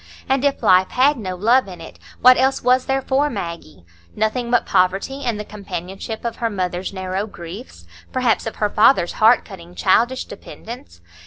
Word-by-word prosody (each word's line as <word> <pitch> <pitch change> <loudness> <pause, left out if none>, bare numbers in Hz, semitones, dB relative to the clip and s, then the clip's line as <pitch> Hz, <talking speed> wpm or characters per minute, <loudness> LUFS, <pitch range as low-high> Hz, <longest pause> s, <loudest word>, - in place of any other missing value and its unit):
And 270 0 +1
if 280 -1 0
life 185 0 +4
had 275 +4 +3
no 185 -4 -4
love 230 +6 +3
in 180 -2 -10
it, 165 - -12 0.2
what 255 +1 +8
else 265 +2 +1
was 250 +1 +2
there 270 0 0
for 275 +3 +1
Maggie? 170 - -7 0.3
Nothing 225 +3 -1
but 245 - +2
poverty 195 +9 0
and 235 -4 -2
the 210 - -5
companionship 200 +2 -7
of 235 - -3
her 230 - -1
mother's 185 -2 -3
narrow 190 +1 -3
griefs, 185 +5 -10 0.3
perhaps 250 -4 0
of 225 - -5
her 210 - 0
father's 215 -5 +4
heart 225 +3 +5
cutting 175 -3 -12
childish 240 +8 +2
dependence. 85 - -11
215 Hz, 175 wpm, -20 LUFS, 185-255 Hz, 0.3 s, what